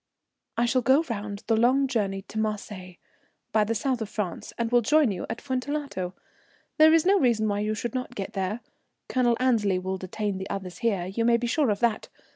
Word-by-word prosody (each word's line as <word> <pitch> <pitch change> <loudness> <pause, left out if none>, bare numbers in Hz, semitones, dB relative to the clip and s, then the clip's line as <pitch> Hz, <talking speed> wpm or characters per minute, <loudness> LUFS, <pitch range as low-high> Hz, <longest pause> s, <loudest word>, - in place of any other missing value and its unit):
"I 235 - +3
shall 255 +2 +2
go 265 +6 +4
round 205 -1 -5
the 225 - +2
long 255 +5 +4
journey 200 -6 -1
to 215 +2 -6
Marseilles, 205 -4 -4 0.5
by 215 -1 +3
the 225 +2 -1
South 255 0 -1
of 215 - -3
France, 210 -5 -4
and 235 -1 -1
will 240 0 +5
join 295 +1 +3
you 180 - -5
at 225 - -4
Fuentellato. 260 -8 -3 0.6
There 315 0 +8
is 325 0 +4
no 395 +1 +5
reason 230 -6 +2
why 205 -1 0
you 215 +1 -1
should 235 +2 -4
not 255 -1 -4
get 195 -3 -5
there. 195 +4 -2 0.5
Colonel 240 -2 +2
Annesley 220 -7 +2
will 190 +1 -3
detain 195 +1 -3
the 190 - -6
others 185 -3 -5
here, 200 -7 0
you 195 +5 -2
may 235 0 +4
be 235 - -3
sure 275 +2 +1
of 205 -1 -1
that. 230 -2 0
220 Hz, 210 wpm, -26 LUFS, 200-250 Hz, 0.6 s, There